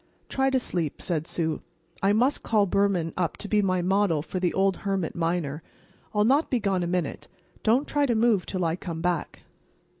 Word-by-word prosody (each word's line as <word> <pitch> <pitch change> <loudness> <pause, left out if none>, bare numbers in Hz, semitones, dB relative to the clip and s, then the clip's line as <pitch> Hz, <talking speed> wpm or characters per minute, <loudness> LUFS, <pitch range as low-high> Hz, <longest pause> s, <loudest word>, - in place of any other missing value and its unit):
"Try 270 0 +1
to 265 -1 +2
sleep," 170 - -2
said 160 -2 -2
Sue. 160 -2 -2 0.4
"I 195 - +3
must 245 +7 +2
call 215 -3 +2
Behrman 190 -4 +1
up 175 -3 -1
to 210 - -6
be 210 0 +3
my 185 -2 +1
model 185 -5 +2
for 185 - -4
the 180 -1 +1
old 195 0 +1
hermit 195 -4 -2
miner. 165 -3 -1 0.5
I'll 210 -1 +2
not 280 +7 +3
be 250 - +1
gone 195 -4 0
a 175 - -1
minute. 180 -1 -2 0.3
Don't 240 +6 +2
try 290 -1 +1
to 240 - +1
move 220 -4 +2
'till 185 -3 -1
I 165 0 +1
come 170 -3 -6
back." 175 -3 -2
190 Hz, 200 wpm, -26 LUFS, 170-215 Hz, 0.5 s, I